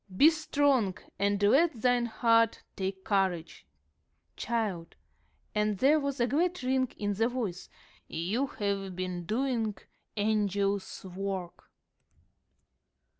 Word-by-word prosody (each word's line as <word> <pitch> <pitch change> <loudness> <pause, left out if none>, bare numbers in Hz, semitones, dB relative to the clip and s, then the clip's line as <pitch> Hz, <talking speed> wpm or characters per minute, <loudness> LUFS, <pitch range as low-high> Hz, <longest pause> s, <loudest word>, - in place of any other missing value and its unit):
'Be 310 +8 +8
strong, 285 - +1 0.2
and 200 0 +1
let 270 +5 +4
thine 245 0 +2
heart 230 0 +2
take 190 -1 -4
courage.' 190 -5 -1 0.7
Child," 210 -8 -2 0.6
and 210 -1 +1
there 285 +9 +4
was 280 -2 -3
a 240 - +4
glad 335 +6 0
ring 260 0 +2
in 205 -1 -1
the 225 +3 +1
voice, 225 -8 -4 0.4
"you 200 +12 -1
have 200 -5 -3
been 180 -2 -4
doing 225 -3 -1 0.4
angel's 200 -2 0
work." 190 -1 -5
210 Hz, 110 wpm, -30 LUFS, 195-255 Hz, 0.7 s, Be